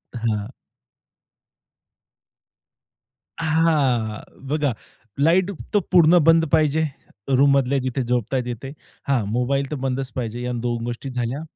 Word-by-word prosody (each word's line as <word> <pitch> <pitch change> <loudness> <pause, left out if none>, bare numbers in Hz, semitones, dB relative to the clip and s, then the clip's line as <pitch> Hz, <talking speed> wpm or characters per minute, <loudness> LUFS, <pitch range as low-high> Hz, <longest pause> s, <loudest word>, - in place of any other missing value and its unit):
हां. 110 -3 -2 2.9
हां. 150 -9 +1 0.3
बघा 145 -3 0 0.5
लाईट 175 +6 +3 0.2
तर 205 - +5
पूर्ण 175 -1 +6
बंद 165 +1 +5
पाहिजे. 155 0 +3 0.4
रूममधल्या 140 0 +3
जिथे 130 +1 -1
झोपताय 125 +1 0
तिथे. 125 +3 -6 0.4
हां 130 -6 +2
मोबाईल 135 +3 0
तर - - -1
बंदच 130 0 -2
पाहिजे 120 -1 -4
या 125 0 -3
2 120 -1 -2
गोष्टी 120 +3 -5
झाल्या. 125 +3 -3
135 Hz, 110 wpm, -22 LUFS, 120-155 Hz, 2.9 s, पूर्ण